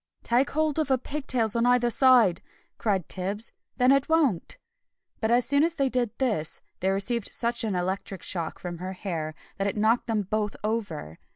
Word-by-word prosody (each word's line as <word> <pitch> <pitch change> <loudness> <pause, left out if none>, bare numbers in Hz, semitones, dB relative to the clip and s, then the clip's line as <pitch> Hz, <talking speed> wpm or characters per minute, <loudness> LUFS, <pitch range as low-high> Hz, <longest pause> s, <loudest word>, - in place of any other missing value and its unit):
"Take 245 +4 +2
hold 310 0 0
of 310 - +1
her 265 - +4
pig 280 +3 -6
tails 230 -3 +2
on 235 +1 +2
either 245 -1 +3
side," 240 -9 +5 0.4
cried 195 -7 0
Tibbs, 200 +4 -2 0.3
"then 250 0 +4
it 275 +1 +2
won't." 290 - +1 0.6
But 220 - 0
as 240 +1 +3
soon 285 +1 +3
as 335 +1 +1
they 275 -3 +1
did 250 -2 0
this, 210 - 0 0.2
they 190 - +1
received 200 +3 -1
such 235 0 0
an 210 -4 -1
electric 185 +1 -3
shock 170 -4 -1
from 175 -2 -6
her 185 +1 -5
hair 165 -5 -4 0.2
that 195 - +1
it 200 - -2
knocked 220 +3 +2
them 220 -3 0
both 210 +1 -2
over! 200 - -3
225 Hz, 190 wpm, -26 LUFS, 190-255 Hz, 0.6 s, side